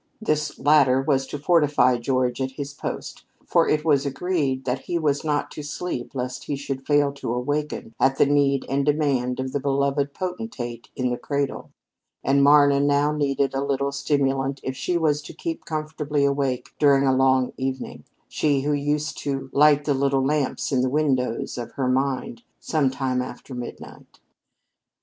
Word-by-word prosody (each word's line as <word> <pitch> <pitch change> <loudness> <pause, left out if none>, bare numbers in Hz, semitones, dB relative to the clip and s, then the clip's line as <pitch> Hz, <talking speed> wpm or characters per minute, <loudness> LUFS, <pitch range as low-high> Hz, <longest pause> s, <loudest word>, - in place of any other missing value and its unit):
This 150 -8 -1
latter 140 -2 +4
was 135 -1 +1
to 145 - -5
fortify 145 -5 +3
George 125 0 0
at 130 0 -2
his 140 +1 -6
post, - - -6 0.2
for - - +2
it 155 +1 +1
was 145 -4 +3
agreed 140 -2 -1
that 130 0 -2
he 175 - -1
was 150 -3 0
not 150 -2 -1
to - - -7
sleep 145 -3 -5
lest 125 -1 -4
he 145 - -2
should 135 -1 -5
fail 145 -1 +3
to 140 -4 -5
awaken 135 -1 -3
at 135 0 +3
the - - +5
need 140 -1 +2
and 140 +1 0
demand 140 -4 +1
of 130 0 -3
the 145 - -1
beloved 140 +1 0
potentate 180 - -5
in 125 -1 -1
the 120 - -3
cradle; 140 -1 -3 0.5
and 140 +1 +3
Marna 145 -1 +6
now 145 +1 +2
needed 140 -2 0
a 135 +1 -1
little 140 0 -1
stimulant 135 -1 0
if 130 - -3
she 155 +7 -1
was 150 -3 +1
to - - -10
keep 330 -2 -5
comfortably 155 -2 -1
awake 140 -2 -1
during 140 -2 +4
a 130 -1 +3
long 130 -1 +3
evening 130 0 -4 0.2
she 145 -3 +1
who 145 +2 0
used 145 +2 -1
to 135 -2 -4
light 145 0 +5
the 145 - +2
little 135 0 +1
lamps 145 0 -1
in 130 -2 +2
the 130 - +1
windows 130 -5 0
of 120 - -7
her 135 -2 -1
mind 140 - -1 0.2
sometime 130 -4 0
after 125 +1 -8
midnight. 125 -1 -9
140 Hz, 175 wpm, -24 LUFS, 130-150 Hz, 0.5 s, Marna